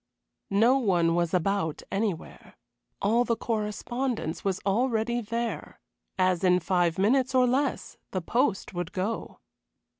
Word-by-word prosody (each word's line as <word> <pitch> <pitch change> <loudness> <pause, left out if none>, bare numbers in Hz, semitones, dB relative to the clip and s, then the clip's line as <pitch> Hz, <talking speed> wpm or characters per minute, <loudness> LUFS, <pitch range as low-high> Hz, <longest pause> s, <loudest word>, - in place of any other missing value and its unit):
No 230 +7 +4
one 175 -8 +2
was 170 -1 +1
about 180 -3 0
anywhere. 195 -4 -3 0.5
All 225 +4 +3
the 235 -1 0
correspondence 225 -2 -3
was 195 -2 0
already 235 +2 +1
there, 230 +1 -4 0.4
as 185 -1 +2
in 180 -1 +4
five 175 -1 +1
minutes 255 +7 +2
or 255 -1 +5
less 265 +3 -1
the 185 - -2
post 225 - 0
would 175 -1 -4
go. 200 +5 -3
205 Hz, 125 wpm, -27 LUFS, 180-240 Hz, 0.5 s, or